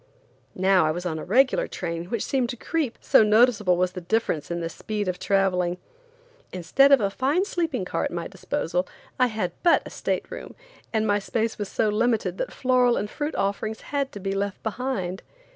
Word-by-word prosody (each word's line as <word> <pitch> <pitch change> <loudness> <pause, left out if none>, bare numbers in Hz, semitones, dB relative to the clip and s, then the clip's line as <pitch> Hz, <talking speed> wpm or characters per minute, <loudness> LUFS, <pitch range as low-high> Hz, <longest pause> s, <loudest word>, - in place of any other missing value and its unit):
Now 185 -3 +4
I - - +1
was 175 +3 -3
on 160 -3 -2
a - - -6
regular 255 +7 +3
train 170 -1 -4
which 215 +4 -2
seemed 255 -3 0
to 245 - -3
creep, 300 -2 -2
so - - +5
noticeable 210 -4 +4
was 180 0 +1
the 180 -1 -7
difference 175 -5 -1
in 170 0 -2
the 165 - -2
speed 210 +4 -4
of 180 -1 -2
traveling. 180 -3 +1 0.7
Instead 185 +11 +3
of 275 - +8
a 200 -2 0
fine 285 - +1
sleeping 325 - -2
car - - -2
at - - 0
my - - -4
disposal, - - -2 0.3
I 250 - +5
had 215 -6 -2
but 345 -2 +4
a - - -9
state - - -3
room, - - -8 0.4
and 220 -1 +1
my 205 -1 +2
space 225 +3 -2
was 205 -2 -3
so 220 - +1
limited 210 -4 0
that - - -2
floral 250 -2 +2
and 210 +1 -3
fruit 300 +1 -3
offerings 210 +2 -2
had 280 -2 -2
to 205 - -7
be 195 0 -3
left 195 0 -3
behind. 215 -6 -3
210 Hz, 200 wpm, -25 LUFS, 185-250 Hz, 0.7 s, of